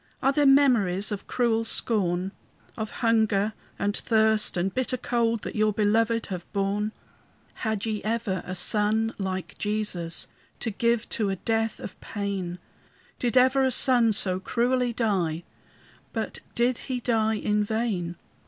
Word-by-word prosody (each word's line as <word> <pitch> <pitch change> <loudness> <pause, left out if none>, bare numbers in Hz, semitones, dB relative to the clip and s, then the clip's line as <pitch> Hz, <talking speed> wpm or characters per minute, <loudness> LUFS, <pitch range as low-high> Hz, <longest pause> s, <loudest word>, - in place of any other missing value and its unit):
Are 270 - +3
there 290 0 +3
memories 230 -9 +4
of 205 - -5
cruel 230 -2 +1
scorn? 190 -5 0 0.4
Of 220 -2 -4 0.2
hunger 220 -2 +3 0.2
and 205 +1 0
thirst 220 -3 +2
and 185 +2 0
bitter 255 0 0
cold 230 -2 0
That - - -5
your 215 0 +3
belovèd 225 +2 +2
have 180 -3 -7
borne? 205 +1 0 0.7
Had 220 -2 -1
ye 215 -2 -2
ever 215 -4 -1
a 185 - -5
son 215 +3 +2
like 190 -1 -4
Jesus 205 -6 -1 0.3
To 225 - -1
give 235 +2 +1
to 215 -3 0
a 195 - 0
death 225 +3 -1
of - - -9
pain? 195 -4 -3 0.6
Did 245 +1 +1
ever 260 +2 +5
a 260 - +3
son 245 -2 +4
so 185 -3 0
cruelly 245 +5 +1
die, 190 -8 0 0.7
But - - -3 0.2
did 240 +1 +2
he 255 -1 -1
die 220 -2 +1
in 210 0 +1
vain? 205 -6 -1
220 Hz, 145 wpm, -26 LUFS, 195-235 Hz, 0.7 s, ever